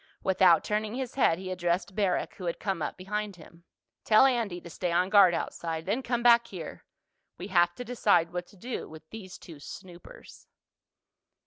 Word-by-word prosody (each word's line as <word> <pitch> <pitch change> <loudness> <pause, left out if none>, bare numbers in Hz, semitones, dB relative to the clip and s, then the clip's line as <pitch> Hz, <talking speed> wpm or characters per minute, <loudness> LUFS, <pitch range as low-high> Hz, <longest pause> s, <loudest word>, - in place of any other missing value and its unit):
Without 185 -3 +4
turning 215 +1 -2
his 260 -1 -4
head 165 -11 +3
he 185 0 -6
addressed 180 +2 -1
Barrack, 200 -3 0
who 185 - -7
had 170 - -3
come 190 -5 -2
up - - -3
behind 210 +2 -4
him. 170 +1 -17 0.4
"Tell 215 +4 +6
Andy 230 -9 0
to 175 - -12
stay 175 +1 -3
on 180 +2 +1
guard 195 -5 +6
outside. 165 -1 -4
Then 210 +7 -1
come 240 -2 -2
back 235 -1 +6
here. 170 -5 -9 0.5
We 185 +4 -7
have 175 -2 +3
to 245 - -7
decide 200 -8 +2
what 175 0 -4
to 200 - -19
do 245 +7 -6
with 155 0 -13
these 190 -4 -9
two 160 -4 -13
snoopers." 175 +3 -12
185 Hz, 185 wpm, -28 LUFS, 175-215 Hz, 0.5 s, Tell